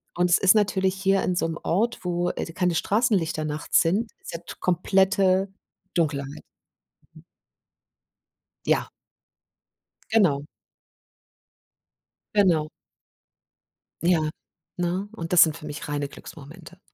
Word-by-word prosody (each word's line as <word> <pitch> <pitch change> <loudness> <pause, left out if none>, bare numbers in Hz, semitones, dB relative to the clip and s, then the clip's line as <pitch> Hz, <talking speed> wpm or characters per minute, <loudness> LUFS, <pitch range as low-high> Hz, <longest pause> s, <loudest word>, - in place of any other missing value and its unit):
Und 180 0 +2
es 175 - +6
ist 195 +2 +5
natürlich 195 -3 +1
hier 195 0 +1
in 180 - 0
so 175 - 0
'nem 165 0 -4
Ort, 225 +7 0
wo, 175 0 -1
äh, - - -4
keine 180 -1 0
Straßenlichter 190 -6 +1
nachts 150 0 +1
sind, 205 +7 0
ist - - -9
ja 165 - -4 0.2
komplette 190 +1 +2 0.4
Dunkelheit. 145 -4 -2 2.3
Ja. - - +1 1.2
Genau. 175 -11 +3 1.9
Genau. 170 -7 +3 1.3
Ja. 165 -3 +2 0.5
Ne? 180 +3 -2
Und 165 -6 -7
das 180 - +8
sind 160 -1 +4
für 155 - -10
mich 155 +2 -6
reine 145 -1 -2
Glücksmomente. 160 +5 -13
175 Hz, 110 wpm, -25 LUFS, 160-195 Hz, 2.3 s, das